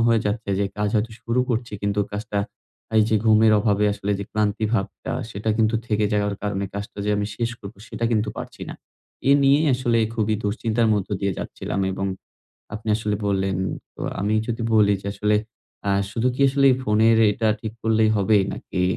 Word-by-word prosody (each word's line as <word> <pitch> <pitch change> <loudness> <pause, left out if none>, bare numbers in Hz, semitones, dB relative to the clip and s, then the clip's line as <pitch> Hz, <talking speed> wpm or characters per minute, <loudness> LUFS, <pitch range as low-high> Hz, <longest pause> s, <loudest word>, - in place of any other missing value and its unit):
হয়ে 115 -1 +4
যাচ্ছে 105 0 -2
যে 100 - +2
কাজ 105 - +1
হয়তো 110 +1 0
শুরু 115 +2 +1
করছি, 120 -1 -2
কিন্তু 100 0 0
কাজটা 105 0 -3 0.6
এই 110 - +7
যে 110 - +3
ঘুমের 110 0 +5
অভাবে 105 -1 +2
আসলে 100 0 -2
যে 100 - -4
ক্লান্তিভাবটা, 105 0 -1 0.2
সেটা 105 +2 -2
কিন্তু 110 0 +2
থেকে 105 -1 +1
যাওয়ার 105 -1 +1
কারণে 100 -1 -2
কাজটা 100 0 -6
যে 105 - 0
আমি 105 - -1
শেষ 115 -1 -1
করব, 100 +2 -9
সেটা 115 - -4
কিন্তু 110 -1 +1
পারছি - - -7
না। - - -6 0.5
এ - - +6
নিয়েই 140 +3 +4
আসলে 120 -2 +1 0.2
খুবই 110 -1 +1
দুশ্চিন্তার 110 +2 +1
মধ্য 100 -1 -2
দিয়ে 100 -1 0
যাচ্ছিলাম 100 - -4
এবং 95 +1 -2 0.7
আপনি 110 +1 -6
আসলে 105 -2 -1
বললেন, 95 -1 0 0.4
তো - - -12 0.2
আমি 105 +2 +1
যদি 115 0 -3
বলি 105 -1 +5
যে - - -8
আসলে, 105 +1 +1 0.5
আ - - +3 0.2
শুধু 115 +4 0
কি 140 - -6
আসলে 140 +1 +3 0.2
ফোনের 110 0 +4
এটা 110 +1 0
ঠিক 110 -1 -5
করলেই 110 -1 +3
হবেই? 100 0 +3
নাকি 90 - -4
105 Hz, 185 wpm, -23 LUFS, 100-115 Hz, 0.7 s, এই